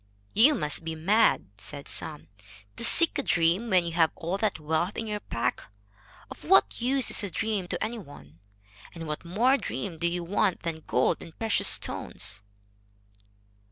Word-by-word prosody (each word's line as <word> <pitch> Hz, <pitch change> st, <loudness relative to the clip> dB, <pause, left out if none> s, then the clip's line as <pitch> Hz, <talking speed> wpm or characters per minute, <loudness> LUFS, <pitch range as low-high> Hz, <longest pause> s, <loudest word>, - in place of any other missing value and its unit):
"You 275 Hz, +8 st, +5 dB
must 150 Hz, 0 st, 0 dB
be 160 Hz, 0 st, -5 dB
mad," 205 Hz, +8 st, +2 dB
said 140 Hz, +7 st, -8 dB
some, 155 Hz, -2 st, -1 dB, 0.5 s
"to -, -, -1 dB
seek 335 Hz, +7 st, +6 dB
a -, -, +1 dB
dream 175 Hz, +1 st, +1 dB
when 185 Hz, -3 st, +3 dB
you 170 Hz, -, -3 dB
have 165 Hz, -1 st, +3 dB
all 180 Hz, +3 st, -4 dB
that 210 Hz, -6 st, -1 dB
wealth 160 Hz, +5 st, -2 dB
in 225 Hz, -, -3 dB
your 210 Hz, -1 st, -4 dB
pack. 115 Hz, -, -4 dB, 0.6 s
Of -, -, -11 dB
what 100 Hz, -, +3 dB
use 260 Hz, +1 st, +2 dB
is -, -, +4 dB
a 200 Hz, -, -3 dB
dream 205 Hz, -1 st, -2 dB
to -, -, -3 dB
any 225 Hz, +2 st, -4 dB
one? 85 Hz, -, -14 dB, 0.6 s
And 165 Hz, -1 st, -7 dB
what 150 Hz, +2 st, -4 dB
more 230 Hz, +10 st, +2 dB
dream 185 Hz, -, -5 dB
do 170 Hz, -, +1 dB
you 175 Hz, 0 st, -2 dB
want 190 Hz, +1 st, 0 dB
than 160 Hz, -2 st, -5 dB
gold 125 Hz, -, +1 dB
and 165 Hz, -, -12 dB
precious 225 Hz, -1 st, +1 dB
stones?" 100 Hz, +2 st, -1 dB
175 Hz, 175 wpm, -27 LUFS, 160-215 Hz, 0.6 s, seek